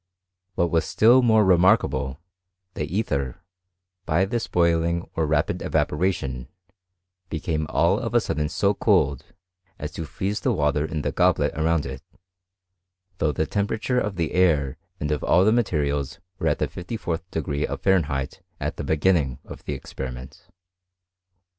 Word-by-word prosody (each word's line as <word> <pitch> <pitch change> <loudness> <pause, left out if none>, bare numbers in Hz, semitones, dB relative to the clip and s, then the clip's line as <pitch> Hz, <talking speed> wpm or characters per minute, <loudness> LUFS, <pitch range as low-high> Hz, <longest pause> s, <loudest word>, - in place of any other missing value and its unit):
What 85 -1 +1
was 80 -2 +2
still 120 +4 +5
more 110 -3 +4
remarkable, 90 - +3 0.5
the 75 - -3
ether, 75 - -2 0.6
by 85 +4 +2
this 115 +3 -2
boiling 85 0 +1
or 80 -2 0
rapid 75 -1 0
evaporation, 75 -7 -1 0.8
became 80 -2 -2
all - - +2
of - - -4
a - - +7
sudden 75 0 -2
so 100 +5 +1
cold, 95 - +2 0.5
as - - -5
to 80 - -5
freeze 100 +7 -3
the - - +1
water 75 0 +1
in 75 -1 -3
the - - -1
goblet - - +2
around 80 0 +1
it; - - -6 1.2
though 75 - +2
the 80 - -1
temperature 110 +7 -1
of 105 -4 -2
the 85 -3 -1
air 75 -8 +2 0.2
and 75 0 -2
of 75 - -1
all 90 - +4
the 110 - +5
materials 75 - 0 0.2
were 80 - 0
at 75 - +2
the - - 0
fifty 90 +6 -6
fourth 90 -2 -4
degree 75 -3 -2
of - - -6
Fahren 95 -4 +4
heit 70 -1 -4 0.2
at - - -3
the - - -4
beginning 75 -5 +1
of - - -10
the - - -3
experiment. 65 -1 -8
80 Hz, 155 wpm, -24 LUFS, 75-95 Hz, 1.2 s, a